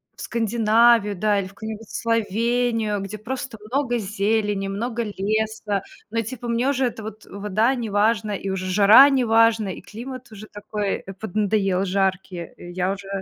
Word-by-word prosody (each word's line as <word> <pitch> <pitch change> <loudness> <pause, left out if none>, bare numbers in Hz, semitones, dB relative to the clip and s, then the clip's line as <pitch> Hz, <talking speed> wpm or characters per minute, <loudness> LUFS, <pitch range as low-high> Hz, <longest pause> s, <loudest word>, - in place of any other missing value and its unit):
в - - -11
Скандинавию, 225 -1 +3
да, 210 +1 +2
или 190 - -3
в 190 - -15
какую-нибудь 220 0 -7
Словению, 230 -1 0
где 195 +2 -6
просто 255 +2 -5
много 255 -1 0
зелени, 205 -1 -1
много 230 +4 -2
леса. 215 0 -1 0.3
Но, 230 +1 0
типа, 240 +2 -6
мне 235 +3 +1
уже 270 -2 +1
эта 230 -2 -4
вот, 215 0 -9
э, - - -20
вода 210 +5 +1
неважна, 215 -1 +1
и 195 -1 -3
уже 190 -1 -3
жара 205 +8 +8
неважна, 230 -4 +3
и - - -10
климат 255 +5 -9
уже 215 0 -10
такой, 205 -1 -3
э, 195 - -7
поднадоел 195 -2 0
жаркий. 190 -1 -1 0.2
Э, 175 - -10
я 185 +2 -1
уже 200 0 -9
215 Hz, 165 wpm, -23 LUFS, 200-230 Hz, 0.3 s, жара